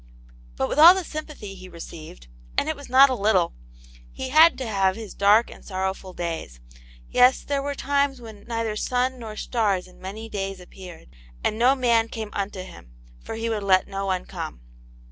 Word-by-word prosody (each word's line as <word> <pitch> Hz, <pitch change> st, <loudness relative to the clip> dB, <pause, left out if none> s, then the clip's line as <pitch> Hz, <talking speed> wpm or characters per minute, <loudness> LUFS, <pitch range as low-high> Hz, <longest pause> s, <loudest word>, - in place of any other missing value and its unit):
But 130 Hz, -, -1 dB
with -, -, -2 dB
all 340 Hz, +4 st, +10 dB
the 380 Hz, -, -2 dB
sympathy 305 Hz, -11 st, -7 dB
he 185 Hz, -1 st, -11 dB
received, 155 Hz, -, -10 dB, 0.3 s
and -, -, +1 dB
it 315 Hz, -, -1 dB
was 285 Hz, -3 st, -12 dB
not 265 Hz, +2 st, +7 dB
a -, -, 0 dB
little, 195 Hz, -6 st, +2 dB, 0.6 s
he 260 Hz, -, -6 dB
had 315 Hz, +4 st, +6 dB
to 260 Hz, -, -4 dB
have 195 Hz, -3 st, +1 dB
his 220 Hz, -2 st, -8 dB
dark 210 Hz, +3 st, +4 dB
and -, -, -13 dB
sor 185 Hz, -2 st, -5 dB
rowful 190 Hz, -1 st, -4 dB
days; 165 Hz, -, -5 dB, 0.5 s
yes, 250 Hz, +1 st, +5 dB
there 280 Hz, -1 st, -1 dB
were 285 Hz, 0 st, -3 dB
times 280 Hz, -1 st, 0 dB
when 220 Hz, -3 st, -12 dB
*' -, -, -20 dB
neither 230 Hz, -2 st, -2 dB
sun 250 Hz, +3 st, -1 dB
nor 220 Hz, -2 st, -7 dB
stars 210 Hz, -5 st, 0 dB
in 180 Hz, -, -19 dB
many 210 Hz, +4 st, -7 dB
days 195 Hz, -3 st, -4 dB
appeared," 180 Hz, -, -12 dB, 0.3 s
and 215 Hz, +2 st, -1 dB
np 260 Hz, +3 st, +5 dB
man 230 Hz, -2 st, +3 dB
came 220 Hz, -2 st, -6 dB
unto 195 Hz, -2 st, -4 dB
him, -, -, -13 dB, 0.3 s
for -, -, -6 dB
he 225 Hz, +1 st, -3 dB
would 220 Hz, -2 st, -1 dB
let 190 Hz, -2 st, +3 dB
no 195 Hz, 0 st, -4 dB
one 185 Hz, -1 st, -1 dB
come. -, -, -7 dB
215 Hz, 200 wpm, -24 LUFS, 190-255 Hz, 0.6 s, all